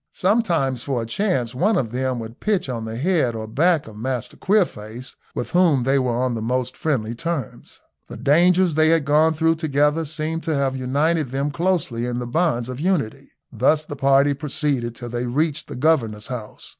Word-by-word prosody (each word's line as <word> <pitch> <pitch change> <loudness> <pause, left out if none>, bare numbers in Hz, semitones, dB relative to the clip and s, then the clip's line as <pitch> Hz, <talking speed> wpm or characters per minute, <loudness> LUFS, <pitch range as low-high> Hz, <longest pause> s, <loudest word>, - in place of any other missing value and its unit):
Sometimes 175 - +1
for 125 -4 -2
a - - -5
change 125 - -1
one 195 - +2
of 115 -9 -1
them 130 0 -1
would 115 0 -8
pitch 210 -7 0
on 115 -3 -3
the 110 +1 -5
head 145 -5 +1
or 110 -1 -4
back 160 +8 +2
of 110 - -11
Master 125 +2 -4
Queerface, 125 - -1 0.2
with - - -4
whom 170 -8 +3
they 135 +2 +2
were 125 -2 0
on 125 0 0
the 115 - -3
most 125 +2 -1
friendly 120 -8 -1
terms. 160 0 -5 0.3
The 120 - -9
dangers 170 +7 +4
they 155 +1 +4
had 165 -3 +3
gone 155 +3 +3
through 165 +1 +2
together 150 0 +1
seemed 160 +2 -3
to 160 - 0
have 135 -1 0
united 145 +4 0
them 140 +3 -2
closely 165 -9 -1
in 120 -1 -2
the 125 - -3
bonds 120 -3 0
of 130 0 -6
unity. 140 - -1 0.2
Thus 145 +6 +2
the 145 - -6
party 140 +1 +3
proceeded 140 -4 -2
till 120 0 -7
they 120 +1 -3
reached 150 +4 -1
the - - -7
governor's 120 -7 +1
house. 120 -5 -7
140 Hz, 195 wpm, -22 LUFS, 120-160 Hz, 0.3 s, dangers